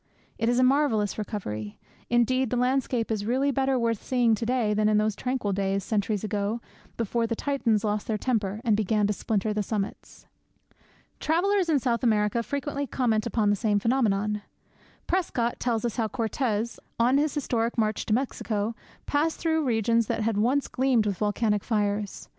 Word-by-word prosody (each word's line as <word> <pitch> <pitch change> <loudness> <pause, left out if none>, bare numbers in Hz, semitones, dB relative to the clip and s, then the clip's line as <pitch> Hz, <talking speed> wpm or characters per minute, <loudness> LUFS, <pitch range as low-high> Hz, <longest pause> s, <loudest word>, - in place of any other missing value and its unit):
It 225 +1 +1
is 245 - +2
a 255 - +4
marvellous 255 -7 +2
recovery. 110 - -5 0.3
Indeed, 240 +1 +2
the 250 - -1
landscape 250 -2 0
is 215 -2 -1
really 260 +6 +1
better 270 0 +1
worth 230 -3 0
seeing 245 -3 +2
to 225 +1 -2
day 240 -4 +1
than 210 0 +2
in 210 - +3
those 215 -1 +1
tranquil 250 -4 -2
days, 195 0 0
centuries 210 0 -1
ago, 210 +1 -1 0.4
before 230 +1 0
the 230 - -1
Titans 235 -6 0
lost 210 -1 -1
their 220 - 0
temper, 215 -3 -1
and 225 -4 +3
began 210 0 +1
to 210 - +1
splinter 210 0 -1
the 210 - 0
summits. 205 0 -5 0.9
Travellers 365 +3 +1
in 310 - +4
South 240 -3 0
America 215 -1 +2
frequently 285 +2 -3
comment 225 -5 0
upon 210 -3 +1
the - - +3
same 210 0 +1
phenomenon. 210 -3 +1 0.6
Prescott 250 -10 -1
tells 235 -2 0
us 235 - -2
how 225 -2 +1
Cortes, 230 0 -2 0.2
on 250 +4 +4
his 300 -1 0
historic 240 -5 -1
march 215 -1 0
to 215 - +1
Mexico, 225 -4 -2 0.3
passed 305 +2 0
through 320 -1 +1
regions 230 -1 +2
that - - -1
had 220 0 0
once 250 +7 +1
gleamed 255 -4 +2
with 200 -3 -2
volcanic 210 0 +1
fires. 205 -2 -1
225 Hz, 175 wpm, -26 LUFS, 210-255 Hz, 0.9 s, a